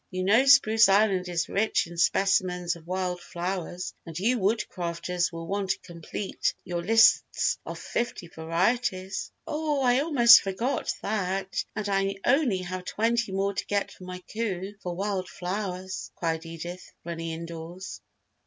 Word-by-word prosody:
You 185 0 -3
know 220 +8 +4
Spruce 225 -6 +7
Island 195 -2 +3
is 165 -3 -1
rich 215 +2 +1
in 170 0 -10
specimens 180 0 +2
of 170 -1 -15
wild 180 -1 -2
flowers 180 0 -4
and 165 -2 -8
you 235 +7 +1
Woodcrafters 180 -4 -1
will 165 -1 -6
want 195 +2 -2
to - - +2
complete 170 +3 -3
your 175 -1 -3
lists 225 +5 +4
of - - -5
fifty 235 -7 -3
varieties." 185 +4 -1
"Oh, 300 -2 -1
I 250 0 +4
almost 270 -6 +7
forgot 230 +8 -1
that! 195 -2 -1
And 215 -1 -3
I 195 0 +1
only 245 -9 +2
have 185 +1 -5
twenty 230 +1 0
more 195 +1 0
to - - -3
get 200 -1 0
for 185 - -12
my 180 0 -7
coup 200 -3 -3
for 180 -1 -4
wild 190 -1 -2
flowers," 185 0 -4
cried 165 -1 -2
Edith, 175 +2 -8
running 165 -1 -4
indoors. 170 +2 -7
190 Hz, 150 wpm, -27 LUFS, 175-215 Hz, -, Spruce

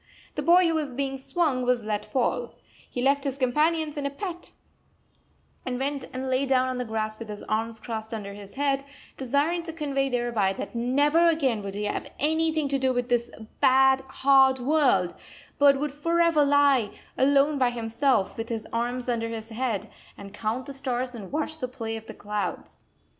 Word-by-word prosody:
The - - -3
boy 355 +1 +5
who 330 - +1
was 295 -5 -2
being 270 0 -2
swung 275 -3 0
was 250 -2 +1
let 210 -1 -3
fall. 245 -2 -1 0.3
He 245 - -3
left 280 +1 +3
his 275 -2 -2
companions 300 +4 +1
in 280 -1 -1
a - - -2
pet, 345 +4 -6 1.1
and 250 -1 -3
went 275 +1 -2
and 260 +1 -4
lay 260 +1 +1
down 260 -1 +3
on 255 -1 -3
the 250 - -2
grass 215 -1 -3
with 230 -2 -8
his 210 -1 -7
arms 225 +1 -2
crossed 220 -1 -5
under 205 -3 -5
his 200 -1 -11
head, 275 0 0 0.3
desiring 285 +7 0
to 330 -1 -6
convey 280 -4 -1
thereby 240 -6 0
that - - -6
never 285 +8 +3
again 275 -10 +2
would 200 -1 -6
he 205 - -3
have 205 - -3
anything 315 0 +1
to 275 0 0
do 260 0 +2
with 245 0 -1
this 240 -1 +1 0.3
bad, 265 0 +5
hard 265 -1 +5
world, 255 - +2 0.5
but 280 -1 +6
would 295 0 -1
forever 335 +1 +3
lie, 280 -6 +4 0.3
alone 280 +2 +3
by 250 -2 +4
himself, 230 -2 0
with 225 0 -4
his 225 -2 -3
arms 245 +2 -2
under 230 -2 -1
his 225 0 -6
head, 225 -3 -2 0.3
and 200 0 -10
count 225 +4 -2
the 280 - -7
stars 255 -2 -2
and 210 -5 -8
watch 310 +2 -3
the 255 - -2
play 225 -3 -5
of 225 0 -8
the 220 - -8
clouds. 210 0 -5
260 Hz, 190 wpm, -26 LUFS, 230-285 Hz, 1.1 s, but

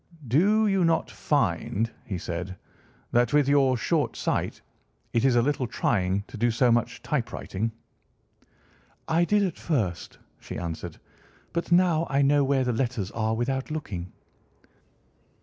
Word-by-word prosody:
"Do 200 - +4
you 195 -3 +2
not 165 -1 +1
find," 115 - 0
he 105 -8 -4
said, 90 +2 -5 0.6
"that 120 +1 +2
with 145 -2 +4
your 135 -3 +4
short - - 0
sight - - -2 0.5
it 115 - +2
is 130 -2 +4
a 120 - +4
little 135 -2 0
trying 95 -3 0
to - - -10
do 120 +3 +2
so 120 +1 +3
much 120 -1 0
typewriting?" 110 +4 -2 1.4
"I 170 +2 +3
did 205 +2 +3
at 185 - -2
first," 105 - -2 0.2
she - - -7
answered, 85 -2 -5 0.6
"but 170 0 -3
now 175 -2 +4
I 140 0 +2
know 145 +1 +4
where 135 -1 +2
the 125 -1 0
letters 115 -5 -2
are 110 0 -1
without 130 +3 -2
looking." 95 - -5
125 Hz, 145 wpm, -26 LUFS, 110-150 Hz, 1.4 s, Do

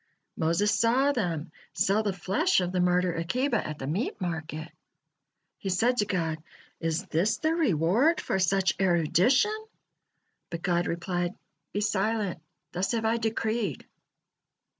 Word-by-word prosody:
Moses 170 +6 +2
saw 255 +5 +3
them 175 - -2 0.2
sell 200 +3 +2
the 210 -2 0
flesh 195 - +1
of 180 -1 -1
the 185 - -1
martyr 180 0 +2
Akiba 240 +9 0
at 155 -1 -5
the 135 - -6
meat 170 - -2
market. 160 -3 -4 0.9
He 195 - -4
said 235 +7 +2
to 205 - +1
God: 160 -4 -1 0.4
"Is 165 0 -1
this 175 +7 +1
the 315 +1 +1
reward 245 - +3
for 190 - -1
such 190 0 +2
erudition?" 190 - +3 1.0
But 170 -1 -6
God 175 -1 +1
replied: 175 +1 -2 0.4
"Be 205 - -2
silent, 205 -3 0 0.3
thus 185 +6 -1
have 225 -1 -1
I 225 +1 +2
decreed." 220 - -2
190 Hz, 140 wpm, -28 LUFS, 170-225 Hz, 1.0 s, saw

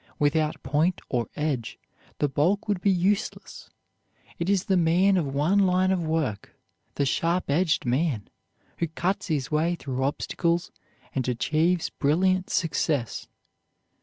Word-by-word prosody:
Without 150 +1 +1
point 150 +7 +1
or 120 -4 -1
edge 145 -7 -2 0.4
the 145 - +1
bulk 170 +10 +1
would 205 -4 -1
be 200 - +2
useless. 195 +2 -1 0.7
It 170 +2 -1
is 195 -2 +2
the 195 - +1
man 180 +3 +4
of 170 -6 +1
one 150 +9 +2
line 185 -1 +3
of 185 -2 +1
work, 155 -10 -2 0.4
the 140 - +1
sharp 170 +3 0
edged 160 0 +1
man, 125 -3 0 0.5
who 170 - 0
cuts 180 +6 -2
his 150 -4 -2
way 160 +3 +1
through 130 -5 -4
obstacles 170 +5 -1 0.4
and 130 -2 -1
achieves 160 +8 +1
brilliant 185 +6 +1
success. 150 - -1
165 Hz, 135 wpm, -26 LUFS, 145-185 Hz, 0.7 s, man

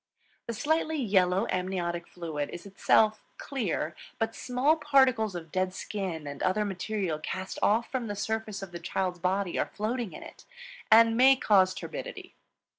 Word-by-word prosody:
The 235 - -3
slightly 315 +5 0
yellow 190 -5 +2
amniotic 180 -2 -2
fluid 155 -5 -4
is 175 - -8
itself 215 +2 +2
clear, 205 - -2 0.2
but 225 -1 -1
small 260 +5 +1
particles 265 - +3
of 165 -2 -7
dead 185 0 -1
skin 185 -7 -4
and 140 -1 -7
other 210 +3 +1
material 190 -4 -2
cast 190 +4 -5
off 225 +3 +2
from 255 -3 -2
the 205 - -3
surface 215 0 -3
of 190 - -8
the 170 - -6
child's 180 +1 -2
body 185 +1 0
are - - -1
floating 225 0 -2
in - - -9
it, - - -13 0.5
and 225 +1 +7
may 265 +3 +7
cause 190 -6 +3
turbidity. - - -7
200 Hz, 160 wpm, -29 LUFS, 180-230 Hz, 0.5 s, and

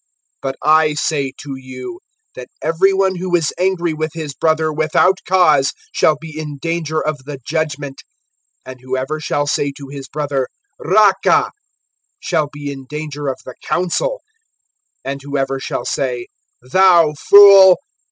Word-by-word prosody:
(22)But 135 0 -3
I 155 0 +4
say 140 -2 -1
to 140 -2 -7
you, 130 - -9 0.3
that - - -9
every 180 +4 +2
one 190 -1 +1
who 180 0 -1
is 165 -3 0
angry 180 -3 0
with 155 0 -3
his 155 -3 -5
brother, 155 +2 0
without 160 +5 +2
cause[5:22a], 155 -7 +3 0.2
shall 155 -2 +2
be 160 -1 -10
in 150 -2 -6
danger 160 0 -2
of 155 -1 -2
the 145 -1 -7
judgment; 145 -3 -3 0.6
and 130 -1 -10
whoever 130 +4 -3
shall 145 -1 -1
say 145 0 0
to 140 -1 -10
his 140 -1 -8
brother, 140 -2 -2 0.4
Raca[5:22b]! 210 - +3 0.7
shall 155 -5 -1
be 145 0 -6
in 135 -1 -10
danger 150 -1 -5
of 130 - -2
the 130 - -8
council; - - -1 0.8
and 135 +1 -4
whoever 135 -1 -2
shall - - -4
say, 125 -3 -2 0.4
Thou 170 +2 +4
fool! 195 +2 +8
155 Hz, 145 wpm, -17 LUFS, 140-170 Hz, 0.8 s, fool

